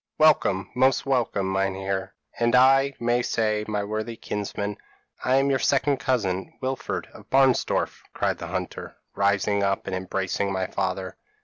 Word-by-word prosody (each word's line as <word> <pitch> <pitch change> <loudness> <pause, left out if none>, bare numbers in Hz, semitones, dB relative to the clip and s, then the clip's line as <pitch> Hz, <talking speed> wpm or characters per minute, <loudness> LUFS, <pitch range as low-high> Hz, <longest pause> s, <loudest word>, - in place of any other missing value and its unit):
Welcome, 100 -11 +3
most 130 +1 +3
welcome, 120 -7 0
Meinheer, 95 0 -1 0.3
and, 120 0 +3
I 135 +2 +5
may 120 +1 +1
say, 110 -3 0
my 105 -1 -1
worthy 110 +2 -3
kinsman. 105 -1 -4 0.5
I 130 - +3
am 135 +1 +3
your 135 - +2
second 140 +1 +2
cousin, 100 -9 -1
Wilfred 130 0 -3
of - - -15
Barnsdorf,' 135 -2 +2
cried - - -1
the - - -5
hunter, - - -5 0.2
rising 100 0 +1
up 100 0 0
and 95 - -3
embracing 95 +1 -2
my 95 -1 -1
father. 95 0 -3
105 Hz, 145 wpm, -25 LUFS, 95-130 Hz, 0.5 s, I